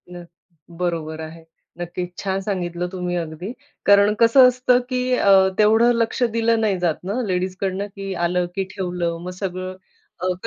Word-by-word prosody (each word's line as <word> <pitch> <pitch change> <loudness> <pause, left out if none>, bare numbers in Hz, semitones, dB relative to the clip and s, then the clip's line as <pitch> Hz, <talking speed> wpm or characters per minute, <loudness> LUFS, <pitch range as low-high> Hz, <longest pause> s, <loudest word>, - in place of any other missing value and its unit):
नक्की, 170 -1 -16
बरोबर 160 -3 -2
आहे. 160 +1 -9 0.4
नक्कीच 175 +1 -5
छान 195 -1 -2
सांगितलं 180 -3 -3
तुम्ही 180 -1 -3
अगदी, 170 +5 -4 0.3
कारण 200 +1 +5
कसं 250 +3 +7
असतं 250 0 +3
की 250 -1 -1
अ, 200 - +3 0.3
तेवढं 220 +3 +5
लक्ष 230 +2 0
दिलं 230 0 +2
नाही 200 -4 +1
जात 165 +1 -1
ना 205 +7 -2
लेडीजकडनं 190 +2 -2
की 195 -1 -5
आलं, 180 0 0
की 195 - 0
ठेवलं 175 -3 -2
मग 180 - -5
सगळं 185 0 -4 0.5
अ, 185 0 0
185 Hz, 155 wpm, -21 LUFS, 175-210 Hz, 0.5 s, कसं